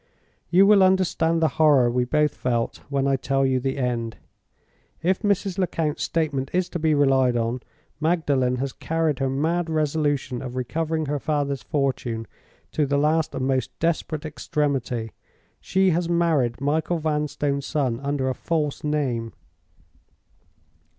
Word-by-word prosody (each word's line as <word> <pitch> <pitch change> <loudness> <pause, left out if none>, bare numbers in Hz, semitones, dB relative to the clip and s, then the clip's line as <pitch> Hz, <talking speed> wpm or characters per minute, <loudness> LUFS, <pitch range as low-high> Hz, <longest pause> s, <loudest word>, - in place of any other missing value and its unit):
You 185 +4 +6
will 205 -1 +6
understand 175 -3 +2
the - - +5
horror 145 -5 +6
we 125 0 +1
both 150 +3 +1
felt 120 -2 -1
when 140 -1 0
I 135 -1 +2
tell 135 +1 0
you 130 -1 +2
the 135 +2 -2
end. 120 -3 -2 0.9
If 185 +2 +2
Mrs. 200 -2 0
Lecount's 165 -5 -1
statement 145 -5 -1
is 180 0 +1
to 175 - -4
be 155 -1 +2
relied 135 -3 +3
on, 115 +2 -1 0.4
Magdalen 145 -6 +1
has 130 +1 -3
carried 160 -3 -1
her 135 -1 0
mad 165 +5 0
resolution 145 -4 0
of 125 -1 -6
recovering 160 +5 -2
her 145 0 -2
father's 145 -2 -1
fortune 130 -6 -2 0.5
to 150 -2 0
the 140 +1 +1
last 155 +2 +1
and 130 - -1
most 130 -3 -1
desperate 160 -2 -1
extremity—she 145 - -2
has 170 +1 0
married 160 -9 +1
Michael 155 +5 0
Vanstone's 150 -2 -1
son 130 -6 0
under 140 -1 -1
a 130 - +1
false 150 -1 -2
name. 130 -7 -1
145 Hz, 145 wpm, -24 LUFS, 130-160 Hz, 0.9 s, You